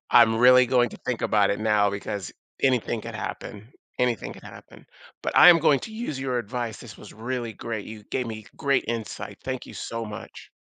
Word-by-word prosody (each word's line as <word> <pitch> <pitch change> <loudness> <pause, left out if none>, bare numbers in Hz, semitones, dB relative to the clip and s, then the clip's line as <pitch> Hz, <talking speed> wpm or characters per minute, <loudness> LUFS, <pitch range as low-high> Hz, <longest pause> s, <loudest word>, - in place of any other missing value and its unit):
I'm 115 -2 +6
really 125 +2 +7
going 120 -1 +3
to - - -10
think 125 -2 -2
about 105 -2 +3
it 100 - -2
now 105 -2 +3
because 100 -1 -5 0.3
anything 125 -3 +1
could - - -8
happen, 110 +4 -7 0.3
anything 125 -3 0
could - - -14
happen. - - -14 0.4
But - - -3
I 180 - +10
am 170 - +9
going 145 -4 +3
to 220 - -8
use 220 - -4
your 130 -2 -1
advice. 120 0 -4
This 110 -5 -11
was - - -12
really 120 +1 -4
great, 110 0 -5
you 110 -1 -10
gave 125 -2 -1
me 110 -1 -7
great 140 -2 +1
insight. 115 -2 -5
Thank - - -4
you - - -11
so 115 0 -5
much. 105 -1 -10
115 Hz, 205 wpm, -25 LUFS, 110-125 Hz, 0.4 s, I